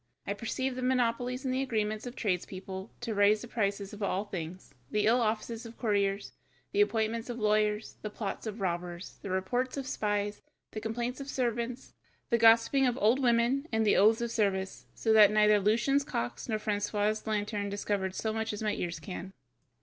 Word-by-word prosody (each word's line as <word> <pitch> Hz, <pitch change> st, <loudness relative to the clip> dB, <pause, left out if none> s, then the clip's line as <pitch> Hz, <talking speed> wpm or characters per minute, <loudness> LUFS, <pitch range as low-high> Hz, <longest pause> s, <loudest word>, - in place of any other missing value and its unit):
I 200 Hz, -, -1 dB
perceive 250 Hz, +5 st, -2 dB
the 255 Hz, -, -4 dB
monopolies 250 Hz, +1 st, 0 dB
and 255 Hz, -, 0 dB
the 260 Hz, -, 0 dB
agreements 215 Hz, -3 st, -1 dB
of 245 Hz, -, -7 dB
tradespeople 190 Hz, -1 st, -3 dB
to 235 Hz, -2 st, -2 dB
raise 210 Hz, +1 st, +4 dB
the -, -, -7 dB
prices 200 Hz, -3 st, -2 dB
of 210 Hz, -, -9 dB
all 200 Hz, 0 st, 0 dB
things, 180 Hz, -2 st, -7 dB, 0.2 s
the 210 Hz, 0 st, +1 dB
ill 235 Hz, +3 st, +4 dB
offices 225 Hz, +1 st, -1 dB
of 230 Hz, -1 st, -10 dB
courtiers, 200 Hz, -3 st, 0 dB, 0.4 s
the 405 Hz, -, +3 dB
appointments 230 Hz, -, 0 dB
of 240 Hz, -, -4 dB
lawyers, 210 Hz, -1 st, +1 dB
the 210 Hz, -, -4 dB
plots 210 Hz, +1 st, -5 dB
of 215 Hz, 0 st, -5 dB
robbers, 175 Hz, -1 st, -4 dB
the 200 Hz, -, -6 dB
reports 245 Hz, +9 st, -1 dB
of 275 Hz, -, -3 dB
spies, 205 Hz, -4 st, -1 dB, 0.3 s
the 215 Hz, -, -5 dB
complaints 240 Hz, +4 st, -3 dB
of 275 Hz, -, -7 dB
servants, 240 Hz, -1 st, -2 dB, 0.4 s
the 235 Hz, -, +4 dB
gossiping 230 Hz, +4 st, +5 dB
of 245 Hz, 0 st, 0 dB
old 230 Hz, +2 st, +3 dB
women, 245 Hz, +4 st, +2 dB
and 220 Hz, -1 st, +2 dB
the 205 Hz, -, +4 dB
oaths 220 Hz, +3 st, +5 dB
of 235 Hz, -1 st, -2 dB
service, 195 Hz, -4 st, -1 dB
so 220 Hz, -, +2 dB
that 210 Hz, -2 st, +8 dB
neither 210 Hz, 0 st, +5 dB
Lucian's 235 Hz, +8 st, +2 dB
cocks 120 Hz, -, -4 dB
nor 220 Hz, -, +1 dB
Francois's 210 Hz, +1 st, -1 dB
lantern 210 Hz, -1 st, -1 dB
discovered 200 Hz, -2 st, -2 dB
so 220 Hz, -1 st, -1 dB
much 220 Hz, 0 st, -2 dB
as 210 Hz, -, -5 dB
my 210 Hz, -1 st, +1 dB
ears 175 Hz, -1 st, -3 dB
can." 190 Hz, -1 st, -7 dB
215 Hz, 190 wpm, -30 LUFS, 205-235 Hz, 0.4 s, that